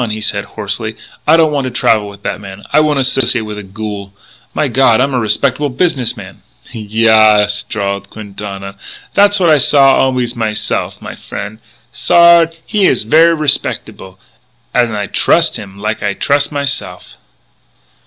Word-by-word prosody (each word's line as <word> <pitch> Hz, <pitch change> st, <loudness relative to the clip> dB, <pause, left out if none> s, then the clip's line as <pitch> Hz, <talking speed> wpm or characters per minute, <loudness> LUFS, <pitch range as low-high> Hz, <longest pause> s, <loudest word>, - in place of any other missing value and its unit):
he 110 Hz, 0 st, -4 dB
said 105 Hz, -1 st, -3 dB
hoarsely. 110 Hz, +1 st, -5 dB, 0.3 s
"I 160 Hz, +2 st, +6 dB
don't 160 Hz, -2 st, +3 dB
want 140 Hz, -3 st, -1 dB
to -, -, -2 dB
travel 110 Hz, -3 st, +1 dB
with 100 Hz, 0 st, -14 dB
that -, -, -4 dB
man! 100 Hz, 0 st, -10 dB
I -, -, +5 dB
won't 150 Hz, -1 st, +1 dB
associate 130 Hz, -3 st, +1 dB
with 105 Hz, -1 st, -7 dB
a -, -, -8 dB
ghoul! 100 Hz, 0 st, -7 dB, 0.4 s
My -, -, -1 dB
God, 125 Hz, -4 st, +3 dB
I'm 135 Hz, +1 st, +1 dB
a 125 Hz, -, +1 dB
respectable 130 Hz, +6 st, 0 dB
business 135 Hz, -3 st, -1 dB
man -, -, -11 dB, 0.2 s
" -, -, -21 dB
"Yaas," 110 Hz, -1 st, +3 dB
drawled 100 Hz, -1 st, -3 dB
Quintana, 100 Hz, -2 st, -8 dB, 0.4 s
"tha's 205 Hz, 0 st, +4 dB
what 175 Hz, -3 st, +3 dB
I 150 Hz, -, +5 dB
saw 135 Hz, 0 st, +4 dB
always 125 Hz, -2 st, 0 dB
myse'f; 110 Hz, -2 st, -3 dB
my -, -, -7 dB
frien' 105 Hz, +2 st, -8 dB, 0.3 s
Sard 170 Hz, +2 st, +4 dB
he 210 Hz, -3 st, 0 dB
is 125 Hz, -, +1 dB
ver' 165 Hz, +8 st, +4 dB
respec'able, 140 Hz, -, -2 dB, 0.6 s
an' 120 Hz, -2 st, +2 dB
I 105 Hz, -1 st, -2 dB
trus' -, -, +1 dB
him 100 Hz, -1 st, -9 dB
like 105 Hz, +2 st, -3 dB
I 105 Hz, -2 st, -2 dB
trus' 145 Hz, 0 st, 0 dB
myse'f." 135 Hz, -11 st, -4 dB
115 Hz, 165 wpm, -14 LUFS, 105-140 Hz, 0.6 s, I